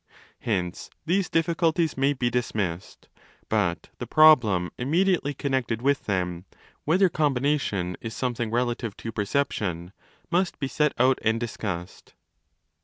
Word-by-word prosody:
Hence 95 -7 -3 0.2
these 180 +2 +1
diffi 165 +1 +1
culties 165 -1 +1
may 135 +2 +2
be 125 -3 -1
dismissed: 105 -7 -3 0.4
but 95 -6 0
the - - -5
problem 115 - +5
immediately 160 +2 +1
connected 130 -4 -1
with 140 0 +1
them—' 90 -3 -2 0.4
whether 185 +5 +4
combination 135 - 0
is 115 -1 -6
something 120 -3 -2
relative 120 -2 -2
to 115 - -6
perception 100 -6 -2 0.4
'—must 180 +1 +1
be 135 - -2
set 150 +2 +1
out 130 +1 +4
and 110 +1 +1
discussed. 100 -6 -6
125 Hz, 125 wpm, -25 LUFS, 100-150 Hz, 0.4 s, problem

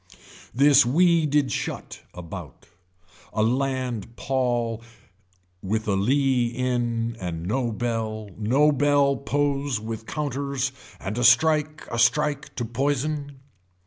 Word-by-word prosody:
This 140 +3 +6
wee 165 +5 +3
did 145 -1 +1
shut, - - -4
about. 85 -5 -9 0.7
A 110 - +1
land 125 -2 -1
paul 120 -4 -1 0.8
with 110 +3 -2
a 100 - +2
lea 130 +4 +2
in 120 -2 -1
and 85 -2 -5
no 120 +4 -1
bell 110 -2 -3
no 130 +8 +3
bell 145 -1 +3
pose 140 -3 -1
with 110 0 -6
counters 140 -2 -2 0.3
and 105 +5 -4
a - - 0
strike 155 +5 +3
a 120 - -2
strike 145 +4 +1
to 120 - -2
poison. 140 +3 -2
125 Hz, 115 wpm, -24 LUFS, 115-140 Hz, 0.8 s, This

